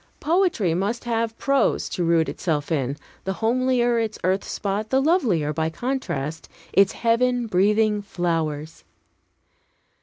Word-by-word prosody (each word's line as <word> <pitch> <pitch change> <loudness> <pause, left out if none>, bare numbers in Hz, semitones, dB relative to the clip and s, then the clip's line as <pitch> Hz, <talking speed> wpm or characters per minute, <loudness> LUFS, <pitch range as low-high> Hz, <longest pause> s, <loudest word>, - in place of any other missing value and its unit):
Poetry 325 - +1
must 200 +7 -1
have 230 -1 -1
prose 275 -1 +1
to 180 - -2
root 165 -1 +3
itself 150 -3 -2
in; 140 -2 -1 0.3
the 190 - -2
homelier 240 +1 +1
its 220 -1 -2
earth 190 +2 +1
spot, 205 +2 -3
the 265 - +3
lovelier, 240 - +2
by 160 +1 -1
contrast, 160 - -4 0.2
its 195 -1 +4
heaven 245 +1 +1
breathing 210 +1 +2
flowers. 165 -5 -3
210 Hz, 125 wpm, -23 LUFS, 165-240 Hz, 0.3 s, its